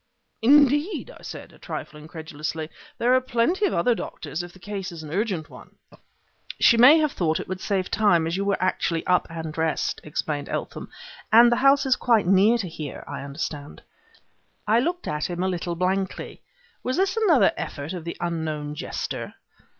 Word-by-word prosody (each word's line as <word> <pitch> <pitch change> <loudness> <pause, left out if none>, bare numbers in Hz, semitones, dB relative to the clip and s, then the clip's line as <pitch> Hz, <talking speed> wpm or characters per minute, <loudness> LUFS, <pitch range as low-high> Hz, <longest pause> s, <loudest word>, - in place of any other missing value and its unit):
"Indeed!" 290 - +4
I - - -16
said, - - -9
a - - -19
trifle 150 - -7
incredulously. 155 0 -6 0.3
"There 245 +2 +2
are 255 - +4
plenty 255 - +1
of - - -3
other 235 +8 +3
doctors 160 -7 -5
if 175 0 -9
the 185 - -17
case 195 0 -6
is 165 -2 -9
an 150 - -9
urgent 190 -6 -1
one." - - -15 0.8
"She 235 - +6
may 250 +7 +8
have 305 -2 +2
thought 160 -3 0
it - - -6
would 185 0 -5
save 190 -3 -1
time 200 -7 +3
as 165 +1 -2
you 195 - -1
were 200 0 +1
actually 175 -2 -1
up 180 0 +2
and 160 -1 -6
dressed," 160 0 -1
explained 150 -1 -3
Eltham; - - -5 0.4
"and 235 +2 +8
the 240 - +2
house 275 +1 +4
is 260 -1 +3
quite 230 -5 +2
near 195 +6 +5
to 210 -6 -3
here, 155 -4 -7
I - - -6
understand." 145 +1 -6 0.8
I 220 +2 +4
looked 350 +7 -2
at 150 +2 -2
him 175 +1 -3
a - - +1
little 175 -1 -2
blankly. 190 +2 -2 0.4
Was 255 - -2
this 385 +2 +1
another 390 - +4
effort 155 0 -5
of 175 -3 -6
the 170 - -6
unknown 155 -3 -3
jester? 150 - -5
185 Hz, 185 wpm, -24 LUFS, 160-240 Hz, 0.8 s, may